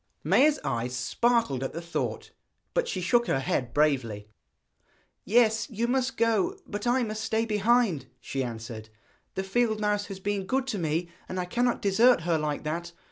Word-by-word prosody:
Maia's 300 +2 +4
eyes 120 +2 -2
sparkled 185 - +1
at 135 - -4
the 165 - -4
thought, 170 0 -4 0.4
but - - +1
she 185 - -2
shook 235 +6 +2
her 135 - +1
head 125 -2 -1
bravely. 125 -9 +1 1.0
'Yes, 225 +2 +3
you 230 0 -1
must 260 +1 0
go; 230 - +2
but 205 +3 -4
I 250 +1 +3
must 215 -1 -3
stay 220 +1 0
behind,' 215 - +2
she 135 +1 -3
answered. 115 -2 -7 0.5
'The 190 - -1
field 220 +2 +1
mouse 210 -1 0
has 195 -2 -7
been 195 -1 -2
good 265 +3 +1
to 210 - -2
me, 165 +1 -1 0.2
and 185 - -3
I 180 - -1
cannot 245 +6 0
desert 225 +4 +5
her 165 -1 +1
like 150 -1 -2
that. 170 +3 -4
200 Hz, 175 wpm, -27 LUFS, 150-235 Hz, 1.0 s, desert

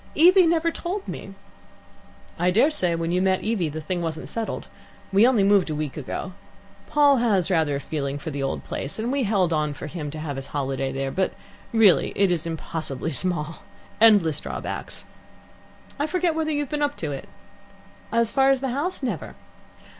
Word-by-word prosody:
Evie 360 +3 +7
never 335 0 +2
told 375 +5 -4
me." - - -7 1.0
"I 175 +1 +3
dare 230 - +4
say 180 - 0
when 165 0 -2
you 180 +1 +1
met 190 0 +1
Evie 210 -8 0
the 160 +2 -5
thing 175 +3 -3
wasn't 160 -1 -4
settled. 230 -1 -4 0.5
We 205 +5 +6
only 240 -6 +3
moved 195 -3 +4
a 155 - -2
week 150 -2 -3
ago. 155 +6 -5 0.5
Paul 290 -2 +4
has 200 -7 +2
rather 160 -5 +2
a - - -2
feeling 140 -1 -3
for 155 +2 -6
the 140 -1 -4
old 135 - -2
place, 140 - -4
and 225 +3 -2
we 280 0 0
held 190 -5 +2
on 150 -2 0
for - - -7
him 150 -1 -5
to 155 - -7
have 150 -3 -4
his 135 - -5
holiday 135 -1 -2
there; 135 0 -3
but, 190 +4 0 0.4
really, 225 -5 +4
it 195 -2 +3
is 170 -2 -1
impossibly 160 -2 -4
small. 165 0 -1 0.4
Endless 200 -10 +5
drawbacks. - - -6 0.9
I 290 - +1
forget 355 -1 +1
whether 315 0 -1
you've 290 -1 -1
been 295 -1 -2
up 290 0 0
to 155 -3 -3
it?" 135 - -7 0.8
"As 230 0 +2
far 270 0 +4
as 270 -1 +3
the 265 0 -2
house, 285 +6 -2
never." 210 - -3
185 Hz, 190 wpm, -24 LUFS, -, 1.0 s, Evie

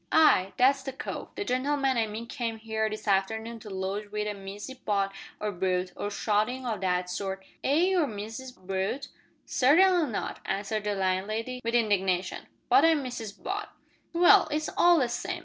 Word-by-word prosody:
"Ay, 195 -12 +5
that's 270 +2 +4
the 270 - -5
cove 265 - -6
the 410 - -3
gen'leman 270 0 +1
I 225 -2 +1
mean 215 +2 -6
came 235 -3 -3
here 220 0 -1
this 215 0 -7
arternoon 220 +4 0
to 215 - -10
lodge 195 +2 -4
wi' 210 0 -2
a 210 0 -2
Missis 200 +5 -8
Butt 200 -2 0 0.3
or 210 0 -2
Brute, 180 -1 -1
or 205 - -3
suthin' 215 +5 0
o' 230 -3 0
that 180 -1 0
sort 190 +1 -4 0.2
air 280 +2 +2
you 365 +2 +3
Mrs 225 +4 -7
Brute?" 190 +8 -3 0.4
"Certainly 330 +2 +4
not," 205 - -3
answered 205 +2 -2
the 205 -1 0
landlady, 215 +6 -1
with 230 +1 -1
indignation; 190 -5 +1 0.2
"but 275 - +6
I'm 325 -3 +4
Mrs 230 -5 -7
Butt." 405 +2 -3 0.4
"Well, 355 +3 +6
it's 305 +1 -2
all 345 0 +6
the 255 -5 +2
same. 235 - -3
220 Hz, 175 wpm, -28 LUFS, 195-265 Hz, 0.4 s, but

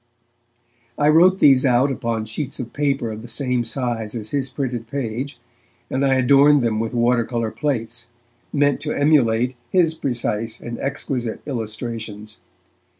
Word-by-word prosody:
I 145 0 +3
wrote 180 +4 +6
these 135 -7 +5
out 130 +1 +3
upon 115 -4 -2
sheets 130 +6 -4
of 120 -2 -6
paper 140 -5 0
of 110 0 -7
the 120 - -10
same 125 0 0
size 115 -2 -2
as 110 -2 -5
his 135 -2 -1
printed 125 -5 -4
page, 130 +1 -4 0.5
and 130 +1 0
I 135 -1 +3
adorned 140 +2 +5
them 110 -2 0
with 115 +2 -3
water 120 0 +3
colour 115 -1 -2
plates, 120 -5 -3 0.4
meant 145 -1 +2
to 150 0 -2
emulate 125 -4 +2
his 170 -4 +3
precise 115 -6 -2
and 120 0 -7
exquisite 130 -4 -3
illustrations. 110 -3 -5
125 Hz, 150 wpm, -21 LUFS, 115-140 Hz, 0.5 s, wrote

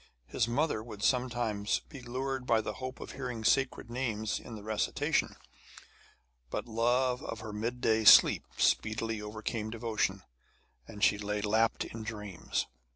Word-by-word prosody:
His 115 - 0
mother 125 -1 0
would 110 -2 -9
sometimes 120 -5 +1
be 140 -5 -12
lured 130 +1 -3
by 115 - +4
the 105 -1 -3
hope 130 0 -5
of - - -7
hearing 125 -4 -5
sacred 130 0 +1
names 115 -4 -2
in 115 - -9
the 105 - -9
recitation; 110 0 0 1.1
but - - -3
love 125 +3 +1
of 115 - -5
her 110 -1 -7
mid 115 +4 -3
day 110 -1 +3
sleep 105 - +8
speedily 110 0 +1
overcame 110 +1 -4
devotion, 110 -4 -1 0.6
and 105 - -7
she 105 - +4
lay 105 0 -2
lapped 110 +2 +2
in 115 - -7
dreams. 105 -5 -3
115 Hz, 150 wpm, -31 LUFS, 105-125 Hz, 1.1 s, sleep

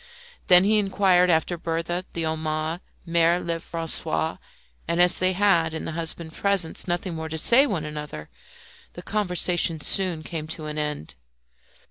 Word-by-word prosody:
Then 180 -1 +7
he 215 +2 +3
inquired 190 -3 +3
after 165 +1 +1
Berthe, 170 +2 -3
the 165 - -3
Homais, 160 +1 -2 0.3
Mere 170 0 +2
Lefrancois, 165 -1 -2 0.5
and 170 +1 -1
as 180 0 +3
they 185 0 +2
had, 170 -5 +2
in - - -5
the - - -4
husband's 165 0 -6
presence, 195 -5 -1
nothing 175 +1 -2
more 160 0 -5
to 160 - -4
say 240 - +6
to - - -3
one 165 -8 -2
another, 150 - -7 0.7
the 175 - -10
conversation 180 -5 +1
soon 175 0 +2
came 155 -1 -6
to 160 -1 -6
an 150 0 -4
end. 150 - -4
170 Hz, 155 wpm, -24 LUFS, 160-180 Hz, 0.7 s, Then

